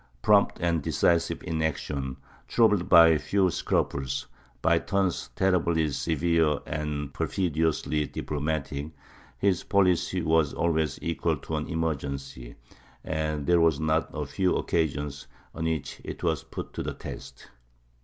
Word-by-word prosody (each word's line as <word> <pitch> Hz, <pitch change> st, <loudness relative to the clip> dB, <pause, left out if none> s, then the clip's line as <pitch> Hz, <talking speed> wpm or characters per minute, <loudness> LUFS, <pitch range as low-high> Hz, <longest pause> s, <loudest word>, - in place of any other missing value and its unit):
Prompt -, -, +4 dB
and 85 Hz, -2 st, +1 dB
decisive 85 Hz, +3 st, +1 dB
in 80 Hz, -3 st, -2 dB
action, 70 Hz, -4 st, -2 dB, 0.3 s
troubled 105 Hz, -6 st, +3 dB
by 80 Hz, -3 st, +7 dB
few 95 Hz, +2 st, +1 dB
scruples, 70 Hz, -3 st, -1 dB, 0.3 s
by -, -, +3 dB
turns 95 Hz, -2 st, -1 dB
terribly 85 Hz, -4 st, +2 dB
severe 80 Hz, +1 st, +1 dB
and 75 Hz, -2 st, -3 dB
perfidiously 80 Hz, -4 st, 0 dB
diplomatic, 75 Hz, -1 st, -3 dB, 0.5 s
his 95 Hz, -3 st, +1 dB
policy 90 Hz, -3 st, +2 dB
was 80 Hz, -3 st, +2 dB
always 80 Hz, -2 st, 0 dB
equal 85 Hz, -1 st, 0 dB
to 80 Hz, +3 st, -5 dB
an 75 Hz, 0 st, -2 dB
emergency; 70 Hz, -6 st, -4 dB, 0.5 s
and 75 Hz, -2 st, -2 dB
there 85 Hz, +1 st, +4 dB
were 80 Hz, -3 st, +3 dB
not 80 Hz, +1 st, +1 dB
a 75 Hz, -1 st, -4 dB
few 95 Hz, +6 st, 0 dB
occasions 75 Hz, -3 st, -1 dB, 0.3 s
on 80 Hz, -, -4 dB
which 80 Hz, -3 st, -3 dB
it -, -, -7 dB
was -, -, +1 dB
put -, -, -7 dB
to -, -, -4 dB
the -, -, -4 dB
test. -, -, -10 dB
80 Hz, 130 wpm, -27 LUFS, 75-85 Hz, 0.5 s, by